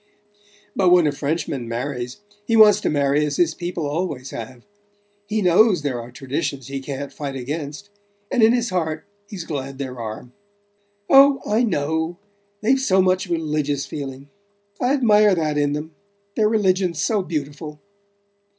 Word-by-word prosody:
But 185 -2 +3
when 175 -2 +6
a 150 - +2
Frenchman 140 -3 -3
marries 125 - -4 0.3
he 230 - +2
wants 210 -2 +7
to - - 0
marry 145 0 +2
as 145 -1 -2
his 165 -2 +2
people 175 -2 -4
always 145 -4 -3
have. 120 +2 -8 0.6
He 215 0 -1
knows 185 -1 +4
there 130 -5 -2
are 115 - -10
traditions 135 0 -4
he 135 0 -3
can't 140 +1 -6
fight 140 -2 -5
against 145 +8 -5 0.4
and 255 - +2
in 220 +1 +7
his 240 -3 0
heart 160 -3 -2 0.2
he's 195 -5 -6
glad 135 -4 -5
there 130 -3 -6
are." 115 +2 -7 0.8
"Oh, 275 0 +7
I 215 +3 +2
know: 160 -3 -1 0.4
they've 255 +5 +3
so 195 -8 +2
much 185 +1 +2
religious 150 -4 -1
feeling. 135 -1 -7 0.5
I 250 +2 +2
admire 215 -7 +4
that 155 -3 -1
in 145 0 +1
them: 150 +2 -5 0.4
their 215 -1 +3
religion's 185 -6 +1
so 215 +3 +1
beautiful." 150 -2 -5
155 Hz, 155 wpm, -22 LUFS, 140-190 Hz, 0.8 s, wants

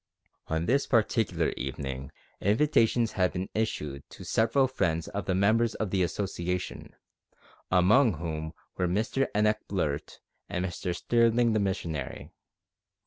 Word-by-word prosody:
On 80 +1 -1
this 140 +7 +2
particular 110 -8 +2
evening 65 0 -4 0.3
invitations 115 0 +3
had 90 -4 +1
been 90 +2 -3
issued 75 -11 -2
to - - -11
several 115 +5 +2
friends 85 -10 -1
of 100 -2 -4
the 95 - 0
members 110 +4 +3
of 105 -4 -2
the 95 - +1
Association, 90 -1 -3 0.7
among 105 +7 +5
whom 80 -1 -4 0.2
were 90 - +1
Mr 110 +8 0
Enoch 105 0 +3
Blurt 75 -7 -2 0.3
and 90 +1 -1
Mr 90 0 -3
Sterling 115 +2 +3
the 110 - +2
missionary. 85 -8 -3
95 Hz, 130 wpm, -28 LUFS, 85-110 Hz, 0.7 s, among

